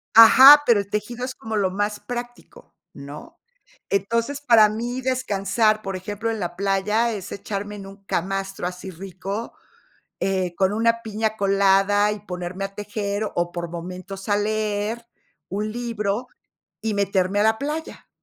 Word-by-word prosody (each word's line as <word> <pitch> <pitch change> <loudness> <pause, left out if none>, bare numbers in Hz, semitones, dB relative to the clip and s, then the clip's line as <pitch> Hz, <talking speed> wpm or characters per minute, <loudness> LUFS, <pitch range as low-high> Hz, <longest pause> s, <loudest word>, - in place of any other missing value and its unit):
Ajá, 265 +6 +10
pero, 235 -5 +5
el 200 - -11
tejido 215 +4 -3
es 255 0 -4
como 220 0 -5
lo 195 -3 +1
más 205 +2 -2
práctico, 245 - -8 0.2
¿no? 150 - -11 0.5
Entonces, 230 +8 -1
para 230 -6 +6
mí 240 +4 -4
descansar, 215 -4 +1
por 195 -2 -4
ejemplo, 205 +4 -4
en 220 - -4
la 175 0 -4
playa 200 +4 +1
es 200 -4 -7
echarme 205 +1 -5
en 200 -1 -9
un 195 +1 -14
camastro, 195 0 -2
así 180 +1 -7
rico, 195 +5 -6 0.7
eh, 185 -2 -1
con 190 +2 +1
una 230 +1 +2
piña 220 0 -2
colada, 200 +1 +3
y 210 - -4
ponerme 180 0 -5
a 195 - -8
tejer, 205 0 -3
o 175 0 0
por 170 -1 -5
momentos 185 +3 -7
a 205 - +4
leer 215 +2 -2 0.4
un 210 +3 -3
libro, 230 -1 -3 0.5
y 220 -1 -1
meterme 195 -1 +1
a - - +4
la 220 0 +3
playa, 300 +3 -5
205 Hz, 155 wpm, -23 LUFS, 195-225 Hz, 0.7 s, Ajá